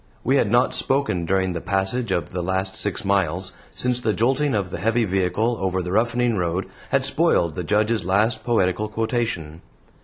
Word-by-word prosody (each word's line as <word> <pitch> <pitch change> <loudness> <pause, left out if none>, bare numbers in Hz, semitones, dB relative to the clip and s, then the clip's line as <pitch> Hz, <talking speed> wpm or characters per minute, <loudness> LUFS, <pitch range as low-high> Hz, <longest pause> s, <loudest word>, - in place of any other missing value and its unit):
We 135 - +3
had 115 - +2
not 120 +3 +3
spoken 135 -11 0
during 95 0 +1
the 85 - -4
passage 95 +4 -1
of 85 -5 -1
the 90 - -3
last 95 +2 -1
six 100 0 -2
miles, 95 -2 0 0.2
since 125 0 -1
the 110 -3 +1
jolting 135 +4 +1
of 95 -3 -2
the - - -4
heavy 115 +2 +1
vehicle 95 +5 0
over 95 -1 -1
the 90 - -4
roughening 120 +2 +1
road 90 +1 -1 0.2
had 135 -1 +2
spoiled 140 - +2
the 90 - -4
Judge's 105 +2 +1
last 105 +5 +1
poetical 105 -3 +1
quotation. 110 -8 -2
100 Hz, 180 wpm, -23 LUFS, 95-120 Hz, 0.2 s, We